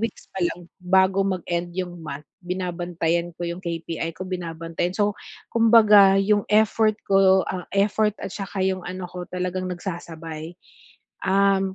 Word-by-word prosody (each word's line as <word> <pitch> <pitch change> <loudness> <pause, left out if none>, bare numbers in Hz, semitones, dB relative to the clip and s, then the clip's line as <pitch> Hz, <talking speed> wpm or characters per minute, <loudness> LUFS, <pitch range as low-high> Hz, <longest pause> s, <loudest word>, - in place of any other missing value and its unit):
weeks 225 -1 -4
pa 190 - -5
lang 175 0 -2
bago 190 +1 +3
mag-end 175 -2 -2
'yong 180 -2 -4
month, 150 -2 -7 0.2
binabantayan 175 -2 -2
ko - - -7
'yong 170 +1 -4
KPI 165 -1 -3
ko, 185 - -5
binabantayan. 170 -1 -4
So 205 -1 +2 0.4
kumbaga 215 -4 +7
'yong 205 +1 +2
effort 215 +1 +3
ko, 190 -1 +5
ah, 180 -2 -4
effort 210 +1 +2
at 195 - -4
'saka 195 -1 -4
'yong 190 -1 -1
ano 185 +1 -5
ko 180 -1 -7
talagang 180 0 -3
nagsasabay. 165 -3 -6 0.7
Um, 195 0 +2
185 Hz, 145 wpm, -24 LUFS, 175-195 Hz, 0.7 s, kumbaga